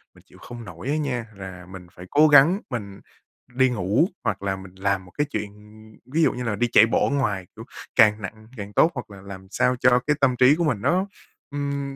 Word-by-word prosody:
mình - - -20
chịu - - -19
không 120 -1 -10
nổi 90 +6 -9
á 150 - +1
nha, 125 -6 -2
là 95 -2 -9
mình 90 -1 -11
phải 90 0 -12
cố 150 +2 +5
gắng 150 +6 +6
mình 100 -5 -6 0.5
đi 130 0 +4
ngủ, 105 - +1 0.2
hoặc 100 -1 -2
là 95 -1 -1
mình 95 -1 -12
làm 95 -1 -1
một 90 - -17
cái 145 - +1
chuyện, 105 -8 -5 0.5
ví 155 +6 0
dụ - - +4
như 125 - -5
là, 110 -3 -2
đi 120 +3 0
chạy 110 - +7
bộ 115 - +1
ở - - -4
ngoài, 100 -9 -1
kiểu, 110 - -10 0.3
càng 110 -2 +5
nặng 110 +3 -9
càng 105 0 -8
tốt, 165 - +4
hoặc 120 -4 -6
là 100 -1 -12
làm 95 -1 -10
sao 125 - +1
cho 125 -1 +4
cái 150 - +3
tâm 130 -2 +3
trí 130 +4 +5
của 170 - -1
mình 125 -11 0
nó, 185 - +1 0.4
ừm, 140 -1 -4
115 Hz, 235 wpm, -23 LUFS, 100-140 Hz, 0.5 s, chạy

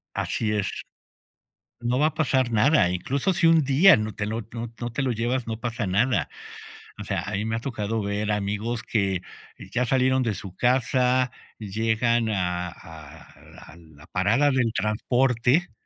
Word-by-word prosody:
Así 105 -1 -1
es. 100 -2 -1 1.1
No 120 +2 0
va 150 - +4
a 155 - -1
pasar 130 -5 +1
nada, 110 - +4
incluso 135 - -1
si 170 -2 +2
un 165 -1 +5
día 145 +8 +6
no 110 0 -3
te 105 - -3
lo 110 +2 -3
no 115 -1 -6
no 120 -1 -4
te 135 - -2
lo 130 -2 0
llevas, 120 +2 -1
no 110 0 -5
pasa 120 -3 -3
nada. 115 +7 +1 0.7
O - - -5
sea, - - -2
a 100 - -6
mí 105 +3 -1
me 110 0 -1
ha - - -2
tocado 115 -4 -3
ver 105 +1 -2
amigos 105 +4 -2
que 95 -4 0 0.5
ya 125 - 0
salieron 130 +1 +2
de 110 -3 0
su 95 -2 -8
casa, 125 +1 +2 0.3
y 105 -2 -8
llegan 115 +2 +1
a 90 -3 -1
a 80 -2 -14
la 75 - -15
la 80 -2 -17
parada 115 +10 +2
del 120 -4 +1
transporte 125 +8 +1
115 Hz, 175 wpm, -25 LUFS, 105-130 Hz, 1.1 s, día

